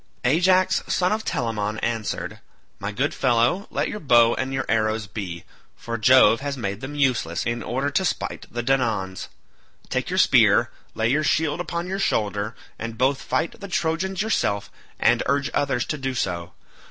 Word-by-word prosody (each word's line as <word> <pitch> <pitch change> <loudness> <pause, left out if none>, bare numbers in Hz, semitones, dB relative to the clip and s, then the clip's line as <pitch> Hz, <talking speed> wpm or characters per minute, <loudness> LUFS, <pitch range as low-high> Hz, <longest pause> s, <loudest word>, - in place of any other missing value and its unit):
Ajax 185 +7 +3
son 180 0 +1
of 220 +1 -1
Telamon 110 -3 -2
answered, 115 -3 -3 0.4
"My 100 +1 -3
good 135 +7 -1
fellow, 125 - +1
let - - -1
your 210 - -5
bow 120 - +5
and 130 0 -3
your 135 -1 -2
arrows 110 -1 +1
be, 90 -5 -6 0.3
for 115 - -5
Jove 130 0 +6
has 140 0 -4
made 100 -3 -4
them 145 +2 -6
useless 125 - 0
in 120 0 -1
order 135 +4 -2
to 190 - +1
spite 185 - -3
the 120 0 -3
Danaans. 115 -8 0 0.6
Take - - -2
your - - -2
spear, - - +5 0.2
lay 110 +1 +1
your 150 +3 +2
shield 155 +1 +1
upon 170 -1 -3
your 190 +2 -3
shoulder, 105 - -1 0.2
and 115 0 -5
both 130 +3 +1
fight 170 - -2
the 200 - -7
Trojans 180 +2 -1
yourself 100 - -1 0.3
and - - +3
urge 140 +1 +1
others 135 -4 0
to 150 - -4
do 135 -1 -3
so. 90 -6 -3
130 Hz, 170 wpm, -23 LUFS, 110-150 Hz, 0.6 s, Jove